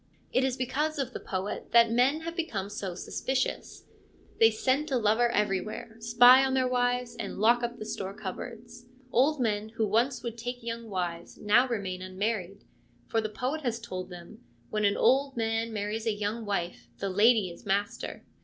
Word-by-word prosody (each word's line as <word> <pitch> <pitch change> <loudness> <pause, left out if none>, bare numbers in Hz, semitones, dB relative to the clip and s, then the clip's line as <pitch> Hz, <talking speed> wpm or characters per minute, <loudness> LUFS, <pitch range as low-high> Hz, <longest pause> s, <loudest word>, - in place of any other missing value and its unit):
It 255 - +3
is 260 -1 0
because 290 +5 -1
of 260 -2 -2
the - - -5
poet 190 +1 -4
that 235 -1 +6
men 260 +6 +3
have 335 +1 -5
become 210 - -3
so 195 -4 -4
suspicious: 265 +7 -3 0.5
they 225 - +8
scent 260 +7 0
a 265 - +1
lover 225 +2 +3
everywhere, 210 +1 -2
spy 245 +3 +7
on 265 0 +1
their 260 -1 +2
wives, 245 -1 0
and 215 -4 -5
lock 235 +4 +4
up 240 0 -3
the 215 - -7
store 195 -1 -5
cupboards. 230 +4 -8 0.2
Old 285 +4 +3
men 215 -3 0
who 225 0 -1
once 235 +5 +1
would 235 -1 -5
take 245 +1 -5
young 230 -1 -5
wives 175 -3 -4
now 230 +5 +4
remain 195 -6 -3
unmarried, 195 +1 -3 0.5
for 225 - +1
the 215 - -3
poet 255 +8 -3
has 240 -4 -2
told 185 -5 -6
them, 175 -1 -11 0.2
' 120 0 -34
When 215 -1 +1
an 200 - +2
old 270 0 +3
man 225 0 0
marries 215 +2 -3
a 220 - +2
young 210 +2 -3
wife, 175 - -3
the 195 - -3
lady 210 -1 +4
is 170 - -13
master.' 200 +1 -2
225 Hz, 185 wpm, -29 LUFS, 205-245 Hz, 0.5 s, they